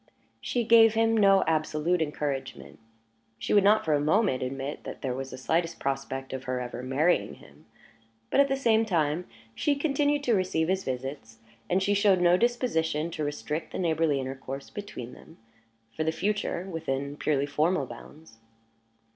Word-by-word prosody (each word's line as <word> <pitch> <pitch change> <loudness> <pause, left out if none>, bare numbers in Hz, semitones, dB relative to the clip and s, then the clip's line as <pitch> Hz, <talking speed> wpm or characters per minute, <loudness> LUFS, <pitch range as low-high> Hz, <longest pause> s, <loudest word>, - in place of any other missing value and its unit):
She 240 - -1
gave 225 -1 +6
him 225 0 +3
no 195 -3 +5
absolute 160 +2 0
encouragement; 145 -3 -4 0.6
she - - -2
would 205 -2 +5
not 210 +2 +4
for 155 - +2
a 145 - +3
moment 155 - +2
admit 135 +3 -4
that - - -8
there 130 -2 -1
was 135 +1 -5
the - - -8
slightest 165 +6 -1
prospect 135 -1 -3
of 130 0 -5
her 130 0 -2
ever 125 0 -5
marrying 140 +7 +1
him; - - -19 0.6
but, - - +3
at 280 - +6
the 270 - 0
same 225 -4 +3
time, 170 -4 0 0.3
she 290 - +1
continued 290 0 +1
to 245 - +2
receive 185 -4 0
his 190 0 0
visits, 130 -3 -5 0.3
and 190 +1 +2
she 205 +1 +2
showed 200 -2 +4
no 175 0 +5
disposition 170 - 0
to 155 - -4
restrict 150 +2 -4
the - - -3
neighborly 160 -4 +1
intercourse 135 +1 -6
between 200 - -7
them, - - -16 0.6
for 155 - -1
the 160 - +1
future, 200 0 -2
within 140 -5 -3
purely 145 -2 0
formal 150 +2 +1
bounds. 120 +1 -13
160 Hz, 170 wpm, -27 LUFS, 135-200 Hz, 0.6 s, gave